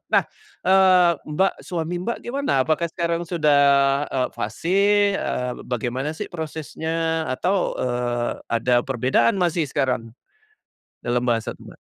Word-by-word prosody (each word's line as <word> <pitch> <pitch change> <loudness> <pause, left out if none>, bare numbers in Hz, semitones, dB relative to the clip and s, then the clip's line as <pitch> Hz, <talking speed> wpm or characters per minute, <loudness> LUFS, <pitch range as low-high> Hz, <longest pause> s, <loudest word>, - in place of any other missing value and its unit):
Eh, - - -61
nah, - - +3 0.4
eee, 185 -2 +5 0.2
Mbak, 190 +6 +2
suami 170 -1 -4
Mbak 235 +6 -2
gimana? 275 +4 -2
Apakah 165 +2 0
sekarang 170 0 -2
sudah, 155 -5 +3 0.5
eee, 130 -1 -1
fasih? 165 - -1 0.4
Eee, 125 0 -2
bagaimana 130 +5 -3
sih - - -4
prosesnya? 160 0 -3
Atau, 180 +9 0
eee, 120 -1 -2
ada 120 +1 +2
perbedaan 125 +1 +1
masih 170 -4 0
sekarang? 125 -4 -2 0.9
Dalam 120 0 -1
bahasa 115 -2 -1
Mbak. - - -14
155 Hz, 125 wpm, -22 LUFS, 125-175 Hz, 0.9 s, eee